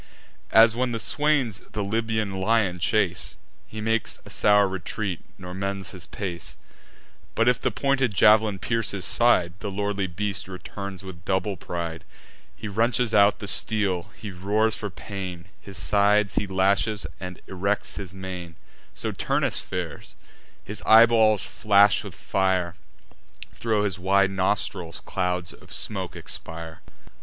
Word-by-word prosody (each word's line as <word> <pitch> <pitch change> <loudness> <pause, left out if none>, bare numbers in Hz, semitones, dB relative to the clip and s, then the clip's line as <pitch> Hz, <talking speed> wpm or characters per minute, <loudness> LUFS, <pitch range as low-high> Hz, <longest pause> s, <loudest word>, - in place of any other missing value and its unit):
As, 110 0 +6
when 125 0 0
the 115 - -1
swains 140 -7 +1
the 105 - -1
Libyan 110 -2 -1
lion 100 -3 +2
chase, 90 -1 0 0.3
He 110 - -7
makes 110 +1 0
a - - -10
sour 105 -1 +4
retreat, 95 0 -3 0.2
nor 90 -2 -8
mends 100 -1 -3
his 90 -2 -9
pace; 85 -5 -5 0.8
But, 115 - +2
if 125 - +3
the - - +2
pointed 135 -3 +1
jav'lin 105 0 +5
pierce 115 +2 -1
his 95 -2 -3
side, 90 -8 +3
The 105 - -4
lordly 100 0 -1
beast 95 +2 -3
returns 95 +1 -7
with 90 -3 -10
double 95 +1 0
pride: 85 -1 -5 0.5
He 110 - -7
wrenches 115 +2 +1
out 100 0 +5
the 100 - -7
steel, 100 -3 0
he 105 - -7
roars 105 +4 +1
for 105 - -4
pain; 95 -3 -7 0.2
His 100 -1 -8
sides 105 0 +3
he 105 - 0
lashes, 100 +2 +1
and 90 -1 -7
erects 100 +2 -2
his 95 -3 -6
mane: 90 -3 -7 0.4
So - - -3
Turnus - - 0
fares; 85 -9 -6 0.5
his - - -7
eyeballs 110 -3 +6
flash 100 -1 +4
with - - -9
fire, 95 -3 0 0.8
Thro' 110 -3 0
his 95 -4 -2
wide 95 +1 +3
nostrils 95 -3 -1
clouds 90 -2 -2
of - - -17
smoke - - -4
expire. 80 -1 -7
100 Hz, 145 wpm, -25 LUFS, 90-110 Hz, 0.8 s, As